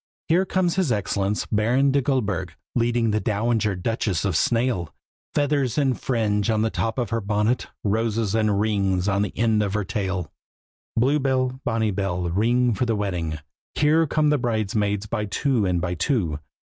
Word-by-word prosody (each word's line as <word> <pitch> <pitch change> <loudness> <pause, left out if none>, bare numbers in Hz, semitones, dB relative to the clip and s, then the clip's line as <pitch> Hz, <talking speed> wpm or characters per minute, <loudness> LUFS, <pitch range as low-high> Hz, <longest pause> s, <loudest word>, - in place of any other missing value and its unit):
Here 180 +4 +3
comes 185 -1 0
his 180 -9 +1
Excellence 100 -1 -1
Baron 125 +6 +2
de 140 +1 +2
Goldburg, 105 - -1 0.2
Leading 120 -1 +1
the 105 - +1
Dowager 110 -1 0
Duchess 105 -1 -1
of 95 -4 0
Snail; 115 - +1 0.4
Feathers 145 -4 +1
and 135 -4 +1
fringe 105 -4 0
on 110 -1 +2
the 110 - 0
top 115 +1 -2
of 120 -2 -2
her 115 0 0
bonnet, 105 +4 0 0.2
Roses 110 0 0
and 110 -2 +2
rings 100 -3 +1
on 100 0 +2
the 105 - -3
end 110 -2 +2
of 100 -1 -1
her 105 - 0
tail. 95 -4 -3 0.7
Blue 135 +6 +3
bell, 130 -1 0
bonny 110 -1 0
bell, 90 -3 -2
ring 120 +5 +2
for 125 +4 -1
the 115 - +1
wedding! 90 -6 -2 0.4
Here 155 +2 +3
come 150 0 +2
the 150 - +2
bridesmaids 105 -3 -1
by 105 0 -2
two 115 0 0
and 90 -1 +1
by 90 +1 -2
two. 90 - 0
110 Hz, 175 wpm, -24 LUFS, 100-125 Hz, 0.7 s, Here